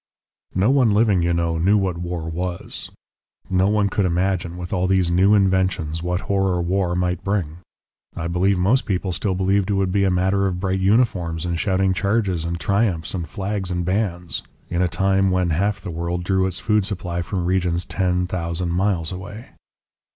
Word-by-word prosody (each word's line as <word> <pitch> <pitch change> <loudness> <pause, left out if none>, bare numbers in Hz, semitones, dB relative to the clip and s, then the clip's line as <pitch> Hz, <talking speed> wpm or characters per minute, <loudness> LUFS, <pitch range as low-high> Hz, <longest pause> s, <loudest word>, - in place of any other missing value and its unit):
"No 100 +7 +3
one 125 -7 +3
living, 105 -4 +3
you 85 0 +1
know, 85 -1 0
knew 100 +5 +4
what 95 -4 -1
war 85 -2 -4
was; 85 +2 -4 0.6
no 95 +1 +3
one 105 -1 +2
could 100 0 0
imagine, 90 0 -1
with 90 +1 -6
all 90 -1 +1
these 95 -2 +2
new 95 +4 +4
inventions, 95 -5 +1
what 90 +2 -1
horror 95 -2 0
war 90 0 0
might 90 0 -1
bring. 90 -6 -1 0.6
I 80 - -4
believe 90 +3 +1
most 105 +10 +2
people 95 -2 -1
still 95 +2 -1
believed 95 +1 +1
it 100 - +1
would 95 -1 +1
be 100 +1 +2
a 95 - +3
matter 95 +2 +2
of 90 -1 -3
bright 95 0 -1
uniforms 95 -6 +1
and 85 -1 -2
shouting 95 +1 +1
charges 100 -3 0
and 85 0 -3
triumphs 100 -6 0
and 85 -3 -4
flags 100 -1 -3
and 90 -1 -2
bands 90 -3 -1 0.3
in 85 +1 0
a 90 - +3
time 95 +3 +2
when 90 -2 +1
half 100 +6 0
the 90 -1 -7
world 85 +1 -3
drew 95 +1 +1
its 90 -2 -3
food 105 -2 +1
supply 90 -3 -3
from 90 0 -3
regions 90 -1 0
ten 90 -2 0
thousand 85 -1 -3
miles 90 -2 0
away 100 +5 -8
95 Hz, 190 wpm, -22 LUFS, 85-100 Hz, 0.6 s, knew